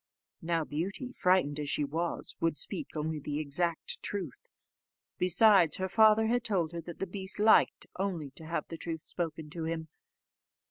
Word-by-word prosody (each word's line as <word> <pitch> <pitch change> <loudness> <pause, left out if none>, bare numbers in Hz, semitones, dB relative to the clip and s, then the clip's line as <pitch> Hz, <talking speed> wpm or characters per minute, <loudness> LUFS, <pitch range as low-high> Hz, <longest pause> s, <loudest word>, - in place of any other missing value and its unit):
Now 165 -1 0
Beauty, 190 - -4
frightened 180 - +2
as 145 -1 -3
she 150 - +1
was, 165 +4 -3
would 165 -2 0
speak 290 - -4
only 155 0 -2
the 145 0 -4
exact 155 +3 -1
truth; 185 -10 -4 0.7
besides, 180 -2 +6
her 190 - -2
father 220 +2 +5
had 240 +2 +1
told 185 -8 0
her 170 -1 -5
that 170 +1 -9
the - - -2
beast 190 +1 -4
liked 215 +1 +4
only 175 -8 -2
to 160 - -9
have 170 - -3
the 165 - -6
truth 160 -1 -5
spoken 160 -3 -5
to 165 -1 -4
him. 160 -1 -4
170 Hz, 170 wpm, -30 LUFS, 155-195 Hz, 0.7 s, besides